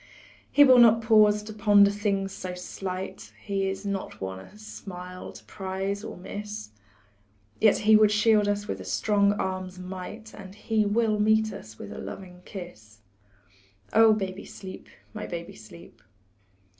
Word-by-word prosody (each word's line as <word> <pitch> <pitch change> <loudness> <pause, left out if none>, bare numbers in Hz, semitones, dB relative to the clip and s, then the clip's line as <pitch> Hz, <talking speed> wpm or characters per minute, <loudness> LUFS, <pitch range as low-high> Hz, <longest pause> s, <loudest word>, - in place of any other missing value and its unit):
He 290 - +7
will 255 -3 +7
not 230 -1 +6
pause 210 -2 +5
to 215 +1 -8
ponder 205 -1 +5
things 200 -1 -1
so 180 -1 -6
slight, 180 - -6
He 195 - -2
is 190 +1 -5
not 200 -1 -4
one 95 0 -5
a 190 - -14
smile 180 -4 -9
to - - -13
prize 195 +1 -4
or - - -7
miss; 205 - -7 0.9
Yet 215 - +5
he 220 0 +7
would 215 -1 +6
shield 210 0 +3
us 205 0 -1
with 95 - -4
a - - -7
strong 200 - +2
arm's 185 -2 -4
might, 190 +4 -8
And 195 -1 -11
he 215 0 0
will 215 0 +1
meet 220 0 +3
us 110 - -11
with 100 - -9
a - - -7
loving 180 -2 -9
kiss 110 - -10 0.9
Oh, 225 0 +7
baby, 195 -2 -4
sleep, 190 -1 -10 0.3
my - - -6
baby, 170 +3 -6
sleep. 170 - -14
200 Hz, 155 wpm, -27 LUFS, 185-215 Hz, 0.9 s, He